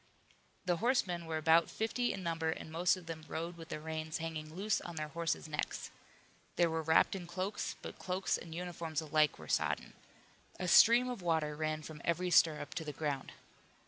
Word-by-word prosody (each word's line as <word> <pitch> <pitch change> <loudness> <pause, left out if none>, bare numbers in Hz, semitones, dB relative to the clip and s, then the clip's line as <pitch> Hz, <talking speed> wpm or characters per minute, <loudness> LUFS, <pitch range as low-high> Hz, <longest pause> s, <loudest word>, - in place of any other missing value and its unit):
The 175 -2 +2
horsemen 180 -7 +1
were 160 -1 -1
about 160 +1 +4
fifty 240 +2 0
in 190 - -5
number 165 -1 -1
and 160 0 -4
most 175 +3 +3
of 180 - -11
them 160 -1 -6
rode 170 +2 -4
with 165 -1 -11
the - - -4
reins 160 0 -4
hanging 160 -1 -5
loose 210 +3 0
on 175 - -7
their 155 -1 -3
horses' 165 0 -2
necks. 150 -1 -3 0.6
They 175 - +4
were 160 -1 0
wrapped 160 +4 +4
in 180 -3 -6
cloaks, 185 +3 -3
but - - -8
cloaks 185 0 0
and 165 -1 -7
uniforms 170 -2 -3
alike 155 -1 +2
were 80 - -11
sodden. - - 0 0.7
A 180 - -2
stream 235 +7 +7
of 245 -5 -4
water 160 -3 0
ran 155 0 -2
from 155 -2 -9
every 180 +2 0
stirrup 155 -4 +4
to 170 - -3
the 150 - -4
ground. 145 -2 -3
165 Hz, 190 wpm, -34 LUFS, 155-180 Hz, 0.7 s, stream